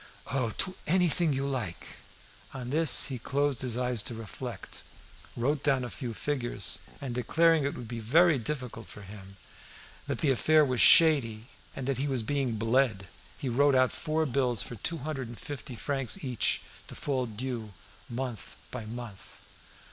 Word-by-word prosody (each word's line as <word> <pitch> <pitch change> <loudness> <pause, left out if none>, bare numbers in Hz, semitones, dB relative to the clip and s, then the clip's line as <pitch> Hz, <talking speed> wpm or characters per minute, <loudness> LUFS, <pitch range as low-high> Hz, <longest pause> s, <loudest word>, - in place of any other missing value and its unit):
"Oh! 130 -3 0
to 185 - +3
anything 175 -1 +3
you 135 0 -1
like." 125 -11 -4 0.6
On 125 -1 -5
this 160 +1 +4
he 130 -3 -4
closed 140 +2 0
his 125 -2 0
eyes 125 -3 0
to 115 - -4
reflect, 110 -2 -7 0.6
wrote 140 +4 0
down 135 -4 +2
a 120 - -5
few 120 -4 -5
figures, 120 -8 -1 0.2
and 135 -3 -4
declaring 160 +6 +3
it 140 - -2
would 120 - -7
be 120 0 -5
very 155 +7 +4
difficult 125 -3 -5
for 105 - -10
him, 95 -1 -11 0.7
that - - -2
the 145 - +3
affair 155 +4 +4
was 130 -3 +1
shady, 130 -8 +6 0.3
and 135 - -5
that 135 -2 -1
he 140 - 0
was 130 -5 -1
being 135 -1 -1
bled, 115 -3 +1 0.3
he 135 - -5
wrote 140 +3 +3
out 130 -1 +4
four 160 0 -1
bills 125 -5 +2
for - - -7
two 165 +9 -3
hundred 140 -3 -4
and 115 0 -9
fifty 135 -3 -7
francs 140 - -2
each, 125 -5 +1 0.2
to - - -9
fall 130 -3 -1
due 115 -1 -5 0.4
month 120 -1 -5 0.2
by 120 -3 -5
month. 115 -3 -9
130 Hz, 170 wpm, -29 LUFS, 115-145 Hz, 0.7 s, shady